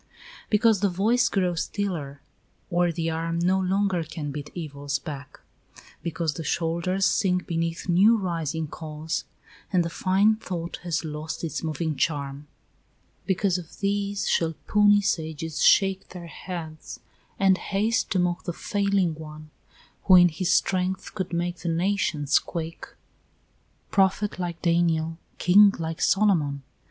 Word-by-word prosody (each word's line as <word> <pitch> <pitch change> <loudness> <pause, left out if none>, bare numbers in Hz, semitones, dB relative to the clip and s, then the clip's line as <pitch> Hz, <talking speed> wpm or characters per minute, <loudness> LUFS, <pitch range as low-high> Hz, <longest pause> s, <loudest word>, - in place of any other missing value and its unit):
Because 220 -1 +4
the 200 0 +2
voice 225 +7 +2
grows 180 -4 0
stiller, 160 -9 -4 0.5
or 175 0 +2
the 165 0 -2
arm 165 +1 -2
No 185 +3 +2
longer 190 -1 +1
can 155 -2 -6
beat 145 0 -6
evils 145 -4 -3
back; 140 0 -9 0.6
because 165 -2 -2
The 165 - -6
shoulders 170 +4 0
sink 180 -1 +1
beneath 165 +1 -2
new 195 +6 +5
rising 165 -5 -2
cause, 155 +1 -5 0.5
And 180 -3 +2
the 170 - -4
fine 200 +5 +2
thought 175 -5 -5
has 170 -2 -3
lost 155 +2 -5
its 160 -4 -3
moving 160 0 -2
charm; 140 -1 -2 0.8
Because 190 -1 +1
of 165 -3 -12
these 200 0 -1
shall 165 -1 +1
puny 205 -1 +5
sages 160 -4 -2
shake 195 -1 +4
Their 180 -2 -9
heads, 165 -1 -8 0.4
and 195 -1 +4
haste 215 +3 0
to 195 - 0
mock 175 -1 0
the 175 - -2
failing 200 -3 0
one, 155 0 -10 0.5
Who 190 - +7
in 175 -1 +8
his 170 +3 -1
strength 185 0 0
could 185 -3 -4
make 175 +1 -2
the 170 - -4
nations 165 -4 +1
quake; 165 -1 -6 1.0
Prophet 195 0 +1
like 175 -2 -4
Daniel, 165 -1 +1 0.2
King 200 +3 +6
like 165 0 -4
Solomon! 160 -9 +2
175 Hz, 140 wpm, -25 LUFS, 160-195 Hz, 1.0 s, in